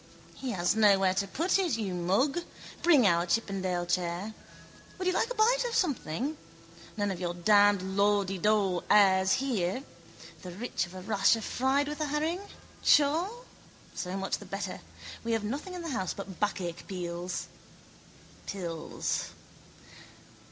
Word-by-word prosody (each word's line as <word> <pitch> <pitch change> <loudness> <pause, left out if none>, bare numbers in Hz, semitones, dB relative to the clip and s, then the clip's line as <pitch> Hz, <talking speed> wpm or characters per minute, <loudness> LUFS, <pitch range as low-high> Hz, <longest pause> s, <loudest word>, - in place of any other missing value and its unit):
—He 265 - -6
has 180 -3 +1
nowhere 195 -3 +4
to 195 +1 -1
put 340 - +1
it, 345 -11 +1
you 200 -5 -3
mug. 195 - +1 0.4
Bring 305 -9 +5
in 195 - +6
our 170 +1 0
chippendale 185 -3 -1
chair. 175 +4 -2 0.6
Would 370 - -4
you 365 - +2
like 460 - +1
a - - -4
bite - - +3
of 475 - -2
something? 285 - -1 0.6
None 205 -1 0
of 185 - -5
your 175 -1 -3
damned 205 +2 +5
lawdeedaw 195 -1 +1
airs 190 -2 +5
here. 250 -4 -1 0.6
The 180 -1 -8
rich 215 -1 -3
of 180 - -13
a 185 - -7
rasher 210 +3 +2
fried 265 +6 +1
with 300 +1 -5
a - - +1
herring? 310 +5 -1 0.4
Sure? 340 +12 +3 0.5
So 180 +1 -4
much 195 0 -2
the - - -11
better. - - -4 0.4
We 230 0 -1
have 225 -2 0
nothing 285 - -4
in 355 - -6
the 330 - -4
house 190 - -2
but 195 -2 -8
backache 180 -4 -2
pills. 175 -1 -4
205 Hz, 145 wpm, -29 LUFS, 185-280 Hz, 0.6 s, in